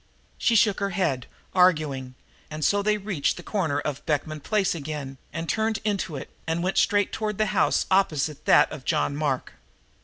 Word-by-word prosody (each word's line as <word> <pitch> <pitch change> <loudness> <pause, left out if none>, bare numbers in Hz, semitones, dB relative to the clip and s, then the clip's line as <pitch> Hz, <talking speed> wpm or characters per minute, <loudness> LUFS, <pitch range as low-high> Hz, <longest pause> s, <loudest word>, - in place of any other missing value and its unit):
She 230 - +3
shook 210 -2 +4
her 200 -1 0
head, 160 -10 -1 0.3
arguing, 150 -8 +2 0.3
and 155 0 -3
so 205 0 +3
they 210 +1 +2
reached 195 -8 -1
the - - -8
corner 160 -9 -1
of 145 -1 -4
Beekman 155 0 -1
Place 200 +4 +1
again 145 -4 -6
and 165 +1 -4
turned 220 +2 0
into 200 -6 -1
it 135 - -7 0.2
and 165 +1 -1
went 190 +1 +1
straight 205 -2 +2
toward 210 -2 -3
the 215 - +2
house - - +2
opposite 155 -6 +1
that - - +5
of - - -7
John 75 -1 0
Mark. - - -2
170 Hz, 180 wpm, -25 LUFS, 145-205 Hz, 0.3 s, that